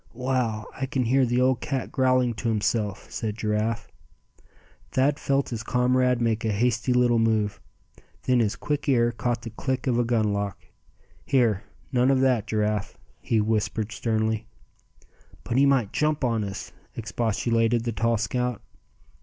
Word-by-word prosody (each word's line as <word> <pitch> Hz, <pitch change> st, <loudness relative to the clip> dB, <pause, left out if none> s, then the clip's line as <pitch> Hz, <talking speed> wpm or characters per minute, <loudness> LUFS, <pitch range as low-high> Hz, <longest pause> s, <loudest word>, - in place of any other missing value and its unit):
"Wow! 125 Hz, -4 st, -1 dB
I 135 Hz, -, -3 dB
can 130 Hz, -1 st, -1 dB
hear 130 Hz, +2 st, +3 dB
the 120 Hz, +1 st, +1 dB
old 130 Hz, -1 st, +2 dB
cat 135 Hz, -3 st, -3 dB
growling 130 Hz, -2 st, +2 dB
to 110 Hz, +1 st, -2 dB
himself," 105 Hz, -2 st, -1 dB
said 110 Hz, -1 st, -3 dB
Giraffe. 110 Hz, +1 st, -1 dB, 1.0 s
Thad 140 Hz, +2 st, +1 dB
felt 140 Hz, 0 st, 0 dB
his 115 Hz, -3 st, -4 dB
comrade 125 Hz, +1 st, +2 dB
make 115 Hz, -1 st, 0 dB
a 110 Hz, -, +1 dB
hasty 120 Hz, +4 st, +1 dB
little 125 Hz, -1 st, +3 dB
move. 110 Hz, -2 st, +1 dB, 0.6 s
Then 125 Hz, -1 st, +3 dB
his 110 Hz, -2 st, +1 dB
quick 145 Hz, +7 st, -2 dB
ear 120 Hz, -3 st, +3 dB
caught 120 Hz, 0 st, -2 dB
the 115 Hz, -, -6 dB
click 130 Hz, +3 st, -3 dB
of 120 Hz, -3 st, +1 dB
a -, -, +3 dB
gun 110 Hz, -3 st, +1 dB
lock. 100 Hz, -2 st, -2 dB, 0.7 s
"Here, 115 Hz, -6 st, +2 dB, 0.3 s
none 125 Hz, 0 st, +3 dB
of 135 Hz, -1 st, +3 dB
that, 125 Hz, -5 st, +2 dB
Giraffe," 105 Hz, -2 st, -1 dB, 0.2 s
he 115 Hz, -, 0 dB
whispered, 110 Hz, 0 st, 0 dB
sternly. 110 Hz, -1 st, -1 dB, 1.0 s
"But 120 Hz, -, -2 dB
he 140 Hz, +1 st, +5 dB
might 130 Hz, -7 st, +2 dB
jump 150 Hz, -1 st, 0 dB
on 115 Hz, -3 st, +1 dB
us!" 100 Hz, -1 st, -6 dB, 0.2 s
expostulated 115 Hz, +1 st, 0 dB
the 120 Hz, -, -1 dB
tall 115 Hz, +2 st, +1 dB
scout. 125 Hz, +2 st, -2 dB
115 Hz, 155 wpm, -25 LUFS, 110-125 Hz, 1.0 s, he